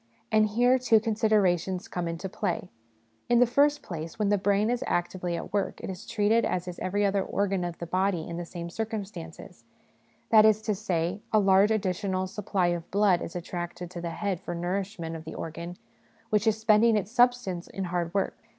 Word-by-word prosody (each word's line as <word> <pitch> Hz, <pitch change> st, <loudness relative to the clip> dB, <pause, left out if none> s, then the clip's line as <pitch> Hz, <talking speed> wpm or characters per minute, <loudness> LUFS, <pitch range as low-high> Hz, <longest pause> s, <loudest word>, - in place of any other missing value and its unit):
And 215 Hz, 0 st, +4 dB
here 245 Hz, +4 st, +3 dB
two 230 Hz, -3 st, +4 dB
considerations 205 Hz, -5 st, +1 dB
come 175 Hz, -1 st, -3 dB
into 165 Hz, +3 st, -4 dB
play. 185 Hz, -2 st, -3 dB, 0.6 s
In 240 Hz, -, +5 dB
the 245 Hz, -, +6 dB
first 290 Hz, +4 st, +2 dB
place, 165 Hz, +2 st, -6 dB
when 210 Hz, -2 st, +1 dB
the 205 Hz, -, +3 dB
brain 205 Hz, +3 st, +2 dB
is 245 Hz, -, -1 dB
actively 175 Hz, 0 st, -1 dB
at -, -, -7 dB
work 200 Hz, -2 st, -1 dB
it -, -, -5 dB
is 185 Hz, +2 st, -9 dB
treated 220 Hz, +2 st, +2 dB
as 180 Hz, 0 st, -1 dB
is 180 Hz, -, -6 dB
every 205 Hz, +2 st, 0 dB
other 200 Hz, 0 st, +2 dB
organ 195 Hz, -2 st, -1 dB
of 175 Hz, -1 st, -4 dB
the 170 Hz, -, -5 dB
body 185 Hz, -1 st, 0 dB
in 170 Hz, -, -5 dB
the 175 Hz, -, -3 dB
same 170 Hz, 0 st, -7 dB
circumstances; 200 Hz, -6 st, -6 dB, 0.7 s
that 215 Hz, -1 st, +8 dB
is 215 Hz, -1 st, +5 dB
to 215 Hz, -, 0 dB
say, 185 Hz, -2 st, -2 dB
a 220 Hz, -, +4 dB
large 195 Hz, 0 st, +5 dB
additional 190 Hz, -2 st, 0 dB
supply 190 Hz, -2 st, -1 dB
of 170 Hz, -1 st, -3 dB
blood 195 Hz, -3 st, +3 dB
is 165 Hz, -, -6 dB
attracted 175 Hz, 0 st, -5 dB
to 175 Hz, -, -6 dB
the 170 Hz, -, -3 dB
head 190 Hz, +1 st, -2 dB
for 175 Hz, -, -5 dB
the -, -, -5 dB
nourishment 185 Hz, -2 st, -3 dB
of 160 Hz, -, -7 dB
the 160 Hz, -, -8 dB
organ 170 Hz, +2 st, -6 dB, 0.5 s
which 210 Hz, +1 st, +2 dB
is 215 Hz, -1 st, +3 dB
spending 220 Hz, 0 st, +4 dB
its 205 Hz, 0 st, -3 dB
substance 245 Hz, -8 st, +2 dB
in 195 Hz, -, -5 dB
hard 175 Hz, -2 st, -2 dB
work. 195 Hz, +1 st, 0 dB
195 Hz, 200 wpm, -27 LUFS, 175-215 Hz, 0.7 s, that